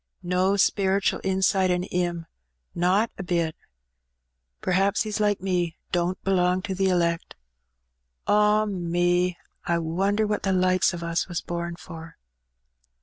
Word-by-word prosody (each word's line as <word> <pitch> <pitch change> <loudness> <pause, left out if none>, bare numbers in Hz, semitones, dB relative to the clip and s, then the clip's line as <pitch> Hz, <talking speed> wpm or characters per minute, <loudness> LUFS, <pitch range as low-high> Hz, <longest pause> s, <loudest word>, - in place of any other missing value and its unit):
No 180 +2 +1
speretual 195 -1 +2
insight 190 0 +2
in 180 0 +1
^im 175 -2 -1 0.3
— - - -51
not 205 +5 +2
a - - -3
bit. 170 -3 -1 1.1
P'r'haps 195 +4 +2
he's 215 -1 -3
like 205 -3 +1
me, 175 -3 -1
don't 175 0 0
belong 185 -1 +1
to 200 -2 -3
the 190 0 +1
elect. 170 -2 0 0.9
Ah, 210 +1 +3
me! 175 -1 0 0.3
I 170 - +1
wonder 195 +6 0
what 210 0 -1
the 195 - 0
likes 185 0 +3
o' 170 -1 -6
us 170 +1 -1
was 175 -3 -3
born 170 0 -4
for?" 165 -2 -11
180 Hz, 140 wpm, -25 LUFS, 175-195 Hz, 1.1 s, Ah